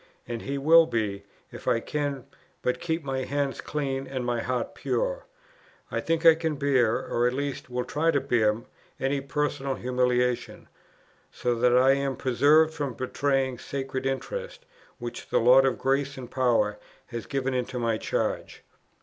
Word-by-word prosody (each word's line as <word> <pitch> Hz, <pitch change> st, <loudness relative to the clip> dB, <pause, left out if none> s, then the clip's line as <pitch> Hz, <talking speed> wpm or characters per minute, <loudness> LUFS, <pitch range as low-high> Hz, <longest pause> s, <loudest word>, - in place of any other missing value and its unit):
and 115 Hz, -1 st, -4 dB
He 140 Hz, +1 st, -3 dB
will 160 Hz, +4 st, +6 dB
be, 105 Hz, -4 st, -2 dB, 0.3 s
if -, -, -11 dB
I 115 Hz, -, +3 dB
can 140 Hz, 0 st, -3 dB, 0.4 s
but 125 Hz, 0 st, 0 dB
keep 165 Hz, -1 st, -2 dB
my 135 Hz, -1 st, -2 dB
hand 140 Hz, +1 st, -2 dB
clean 135 Hz, -2 st, -3 dB
and 130 Hz, -2 st, -4 dB
my 120 Hz, -1 st, 0 dB
heart 125 Hz, -1 st, -2 dB
pure. -, -, -2 dB, 0.6 s
I -, -, -1 dB
think 165 Hz, +1 st, -1 dB
I 165 Hz, -, +10 dB
can 160 Hz, -1 st, -2 dB
bear, 130 Hz, -5 st, +2 dB
or 120 Hz, +1 st, +1 dB
at 125 Hz, -, 0 dB
least 140 Hz, -1 st, -4 dB
will 125 Hz, 0 st, -2 dB
try 160 Hz, +3 st, 0 dB
to 145 Hz, -3 st, +3 dB
bear, 115 Hz, -4 st, +1 dB, 0.4 s
any 135 Hz, +1 st, 0 dB
personal 140 Hz, -1 st, -2 dB
humiliation, 125 Hz, -1 st, 0 dB, 0.6 s
so 125 Hz, -, -1 dB
that 120 Hz, +1 st, +3 dB
I 130 Hz, +1 st, +6 dB
am 135 Hz, -1 st, 0 dB
preserved 145 Hz, +6 st, +4 dB
from 145 Hz, -6 st, -3 dB
betraying 130 Hz, 0 st, 0 dB
sacred 135 Hz, -1 st, -4 dB
interests, -, -, -4 dB, 0.3 s
which 120 Hz, 0 st, -7 dB
the -, -, +2 dB
Lord 130 Hz, +3 st, +6 dB
of 130 Hz, -, 0 dB
grace 135 Hz, +1 st, 0 dB
and 125 Hz, -2 st, -8 dB
power 115 Hz, -5 st, +1 dB, 0.3 s
has 120 Hz, -2 st, -6 dB
given 135 Hz, -1 st, -1 dB
into 125 Hz, 0 st, -2 dB
my 115 Hz, -2 st, 0 dB
charge." -, -, -2 dB
135 Hz, 165 wpm, -27 LUFS, 125-145 Hz, 0.6 s, I